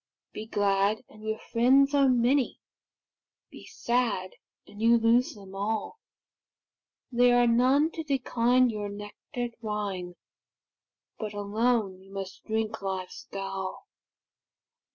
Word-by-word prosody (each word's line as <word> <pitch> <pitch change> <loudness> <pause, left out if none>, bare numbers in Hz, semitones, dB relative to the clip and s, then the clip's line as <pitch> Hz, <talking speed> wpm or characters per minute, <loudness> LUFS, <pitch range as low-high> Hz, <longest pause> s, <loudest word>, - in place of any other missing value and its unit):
Be 215 - -7
glad, 205 +1 +1
and 215 - -15
your 220 0 -2
friends 265 +6 +3
are 280 -2 +4
many; 250 +2 +2 0.9
Be - - -12
sad, 235 -6 -1 0.3
and 205 - -12
you 230 +1 +5
lose 230 +2 +3
them 195 -2 -12
all; 210 - -3 1.1
There 245 0 +4
are 245 - +5
none 260 +7 +3
to 325 - -5
decline 255 -3 +2
your 210 -1 -4
nectar'd 205 +4 -6
wine, 200 -5 -4 1.0
But 210 -2 -5
alone 205 -1 0
you 195 +1 -17
must 195 -1 -7
drink 220 0 -2
life's 190 -2 -5
gall. 195 -1 -5
220 Hz, 115 wpm, -28 LUFS, 200-245 Hz, 1.1 s, you